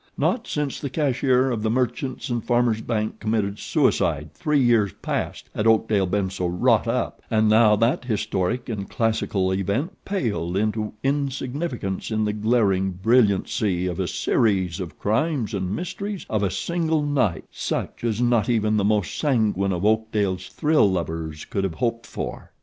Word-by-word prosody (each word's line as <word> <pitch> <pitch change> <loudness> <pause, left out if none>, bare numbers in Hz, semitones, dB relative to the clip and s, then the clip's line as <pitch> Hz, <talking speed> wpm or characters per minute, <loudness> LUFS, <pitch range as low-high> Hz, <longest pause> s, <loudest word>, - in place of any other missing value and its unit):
Not 240 -1 0
since 150 -2 -2
the 140 - -4
cashier 130 -2 +2
of 115 -3 -2
The 110 - 0
Merchants 130 +2 -1
and 120 -2 -1
Farmers 120 -2 +2
Bank 110 -2 -2
committed 105 -2 -1
suicide - - +1
three 150 -1 +1
years 115 -6 +3
past - - -3
had 110 - 0
Oakdale 110 -3 +3
been 95 0 0
so 90 -2 -2
wrought 90 +1 +2
up, - - -1
and 110 0 +3
now 110 0 +6
that 115 +4 +1
historic 105 0 -1
and 100 -4 -4
classical 110 -5 0
event 100 - -1
paled 105 - -2
into 110 +1 -1
insignificance 135 - -2
in 110 -1 0
the 105 - 0
glaring 105 -3 +2
brilliancy 100 -3 +2
of 90 -1 -3
a 95 - 0
series 95 -1 +1
of 90 -3 -6
crimes 120 +2 0
and 95 -2 -2
mysteries 190 +3 -5
of 110 -2 +1
a 100 - +1
single 160 - 0
night 135 -11 0
such - - -4
as 115 -2 0
not 120 -2 +2
even 110 -2 +2
the 105 - +2
most 105 -2 +1
sanguine 110 - +1
of 90 +1 -1
Oakdale's 105 -4 +1
thrill 150 -8 +3
lovers 80 -3 -3
could 100 - -2
have 95 -4 -2
hoped 115 -2 -2
for. - - -6
110 Hz, 160 wpm, -24 LUFS, 100-125 Hz, -, now